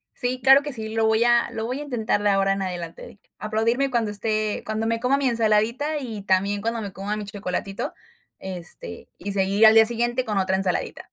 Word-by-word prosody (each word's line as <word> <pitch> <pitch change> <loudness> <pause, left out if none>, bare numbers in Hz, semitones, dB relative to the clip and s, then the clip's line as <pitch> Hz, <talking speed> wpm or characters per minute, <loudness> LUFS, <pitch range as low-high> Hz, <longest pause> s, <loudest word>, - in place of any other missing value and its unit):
Sí, 250 +1 -2
claro 270 +1 +7
que 290 -3 -4
sí, 220 -2 -4
lo 225 0 +1
voy 220 +1 +3
a 240 0 +3
lo 220 0 -4
voy 255 +4 -4
a - - -5
intentar 225 -6 -1
de 205 - +2
ahora 195 0 +2
en 195 - -4
adelante 175 -3 -5
de 205 - -13 0.2
aplaudirme 230 +5 0
cuando 230 -4 -1
esté 215 0 -2
cuando 220 +1 -2
me 230 0 -1
coma 255 +3 +1
mi 270 -2 +1
ensaladita 235 +6 +1
y 220 -7 -6
también 200 +1 +1
cuando 230 +1 -2
me 200 -2 -6
coma 200 +2 -4
mi 210 -1 -5
chocolatito, 195 -1 -5 0.5
este, 175 - -6
y 200 +2 -5
seguir 200 +2 +3
al 220 - +8
día 220 0 +7
siguiente 240 +2 +4
con 210 -2 -2
otra 190 0 +1
ensaladita. 190 -2 -2
220 Hz, 215 wpm, -23 LUFS, 200-235 Hz, 0.5 s, al